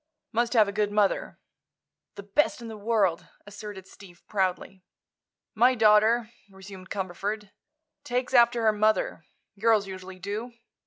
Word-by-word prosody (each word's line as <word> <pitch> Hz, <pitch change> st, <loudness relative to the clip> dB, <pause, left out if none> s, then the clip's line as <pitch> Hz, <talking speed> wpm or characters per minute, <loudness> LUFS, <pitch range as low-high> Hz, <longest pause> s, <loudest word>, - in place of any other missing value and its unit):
Must 235 Hz, +1 st, 0 dB
have 220 Hz, -4 st, +5 dB
a -, -, -2 dB
good 205 Hz, 0 st, -1 dB
mother." 205 Hz, -1 st, 0 dB, 0.8 s
"The 200 Hz, -, -8 dB
best 205 Hz, +10 st, +1 dB
in 235 Hz, -1 st, -8 dB
the 220 Hz, -, -7 dB
world," 205 Hz, -5 st, 0 dB, 0.2 s
asserted 205 Hz, -2 st, -9 dB
Steve, 185 Hz, -3 st, -16 dB
proudly. 190 Hz, -1 st, -2 dB, 0.7 s
"My 245 Hz, +3 st, +4 dB
daughter," 220 Hz, +1 st, +4 dB, 0.2 s
resumed 190 Hz, -1 st, -12 dB
Cumberford, 200 Hz, +2 st, -4 dB, 0.5 s
"takes 250 Hz, -1 st, -2 dB
after 235 Hz, -1 st, +4 dB
her 220 Hz, -1 st, +4 dB
mother. 215 Hz, +1 st, 0 dB, 0.3 s
Girls 220 Hz, -1 st, +3 dB
usually 190 Hz, -1 st, -9 dB
do. 210 Hz, +6 st, -5 dB
210 Hz, 135 wpm, -27 LUFS, 195-230 Hz, 0.8 s, have